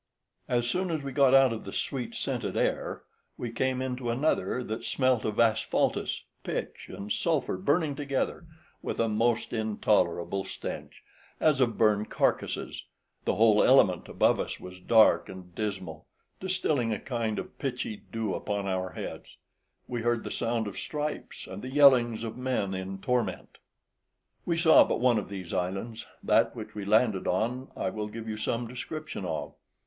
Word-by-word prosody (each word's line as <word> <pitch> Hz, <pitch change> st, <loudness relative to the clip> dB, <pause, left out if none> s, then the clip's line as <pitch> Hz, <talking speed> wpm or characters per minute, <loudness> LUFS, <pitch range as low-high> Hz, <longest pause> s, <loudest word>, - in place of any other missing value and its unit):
As 120 Hz, -1 st, +1 dB
soon 185 Hz, +9 st, 0 dB
as 160 Hz, -3 st, -2 dB
we 140 Hz, -, -4 dB
got 135 Hz, -1 st, +5 dB
out 135 Hz, -3 st, +6 dB
of 110 Hz, -, -6 dB
the 100 Hz, -, -7 dB
sweet 125 Hz, +2 st, -3 dB
scented -, -, -2 dB
air, -, -, -1 dB, 0.3 s
we 120 Hz, -, -4 dB
came 130 Hz, +1 st, 0 dB
into 125 Hz, -1 st, -3 dB
another 125 Hz, 0 st, 0 dB
that 110 Hz, -1 st, -4 dB
smelt 130 Hz, -4 st, +1 dB
of 105 Hz, -1 st, -2 dB
asphaltus, 115 Hz, -1 st, +1 dB, 0.2 s
pitch, -, -, -4 dB
and 100 Hz, +1 st, -4 dB
sulphur 160 Hz, -, 0 dB
burning 145 Hz, -, +1 dB
together, 140 Hz, +3 st, -2 dB, 0.3 s
with -, -, -4 dB
a 115 Hz, -, +3 dB
most 115 Hz, +2 st, +1 dB
intolerable 105 Hz, -4 st, +1 dB
stench, -, -, -7 dB, 0.4 s
as 150 Hz, -4 st, +3 dB
of 120 Hz, -3 st, +2 dB
burned 105 Hz, -1 st, +3 dB
carcases: -, -, -1 dB, 0.4 s
the -, -, +1 dB
whole 110 Hz, -1 st, +5 dB
element 100 Hz, -9 st, +4 dB
above -, -, +3 dB
us -, -, -3 dB
was 90 Hz, 0 st, -10 dB
dark 110 Hz, +4 st, +5 dB
and 90 Hz, -2 st, -10 dB
dismal, 95 Hz, -6 st, -4 dB, 0.3 s
distilling 155 Hz, -10 st, 0 dB
a 105 Hz, -, -1 dB
kind 115 Hz, -4 st, -2 dB
of 185 Hz, -, -7 dB
pitchy 125 Hz, -6 st, -3 dB
dew 110 Hz, -4 st, -2 dB
upon 100 Hz, -1 st, -2 dB
our 95 Hz, -1 st, -2 dB
heads; -, -, -7 dB, 0.5 s
we 120 Hz, -2 st, -3 dB
heard 120 Hz, 0 st, +1 dB
the -, -, -5 dB
sound 115 Hz, -1 st, -1 dB
of 100 Hz, -, -5 dB
stripes, 150 Hz, 0 st, -4 dB
and 95 Hz, +2 st, -8 dB
the 130 Hz, -, -6 dB
yellings 125 Hz, -5 st, +5 dB
of 115 Hz, -1 st, -4 dB
men 125 Hz, -7 st, -1 dB
in 95 Hz, +1 st, -4 dB
torment. 125 Hz, +5 st, -2 dB, 0.9 s
We 170 Hz, -1 st, +1 dB
saw 165 Hz, -1 st, +7 dB
but -, -, -1 dB
one 120 Hz, -2 st, +4 dB
of 100 Hz, -, -7 dB
these 95 Hz, -4 st, -6 dB
islands; 95 Hz, +5 st, -3 dB, 0.2 s
that -, -, +3 dB
which -, -, -7 dB
we 105 Hz, -2 st, -5 dB
landed 110 Hz, -1 st, +3 dB
on 125 Hz, +8 st, -1 dB
I -, -, -1 dB
will 105 Hz, 0 st, -4 dB
give 115 Hz, +1 st, -7 dB
you 110 Hz, -1 st, -3 dB
some 115 Hz, +2 st, -1 dB
description 125 Hz, -1 st, -6 dB
of. 80 Hz, -3 st, -3 dB
115 Hz, 165 wpm, -29 LUFS, 105-130 Hz, 0.9 s, saw